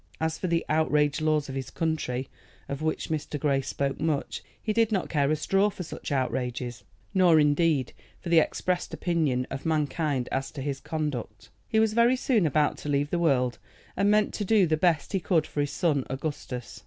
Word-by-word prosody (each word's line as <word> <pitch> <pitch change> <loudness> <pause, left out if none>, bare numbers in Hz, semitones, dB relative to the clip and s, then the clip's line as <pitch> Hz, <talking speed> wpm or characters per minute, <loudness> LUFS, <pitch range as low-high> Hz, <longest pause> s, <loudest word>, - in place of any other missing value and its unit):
As 160 0 -1
for 185 - -2
the 170 -1 0
"outraged 150 -1 +2
laws 155 -2 +1
of 135 - -6
his 135 -1 -4
country," 145 -6 -2 0.4
of 140 +1 -5
which 155 0 -2
Mr. 150 -1 -3
Grey 140 -1 +1
spoke 135 +1 -2
much, 155 -3 -1 0.2
he 215 - -2
did 225 0 +2
not 195 -4 0
care 140 -3 +1
a 155 - +3
straw 195 +7 +2
for 190 - -7
such 155 - -7
outrages 125 -3 -2 0.3
nor, 180 -5 +5
indeed, 150 -2 +2 0.3
for 175 - -7
the 170 -1 +6
expressed 180 +3 -1
opinion 155 -8 0
of 135 - -5
mankind 150 -4 0
as 135 0 -1
to 135 - -7
his 140 -1 -3
conduct. 135 -10 -4 0.2
He 220 - +2
was 220 -1 +3
very 235 +3 +4
soon 235 -8 +2
about 150 0 +1
to 150 - -6
leave 145 0 0
the 175 - +1
world, 125 -7 +1 0.4
and 200 +1 +2
meant 210 0 +3
to 210 - -2
do 205 -1 +4
the 160 -2 +2
best 165 +1 +1
he 195 - +2
could 165 -3 +1
for 145 - -2
his 145 - -1
son 150 -7 +1
Augustus. 130 -3 -5
155 Hz, 200 wpm, -27 LUFS, 140-170 Hz, 0.4 s, the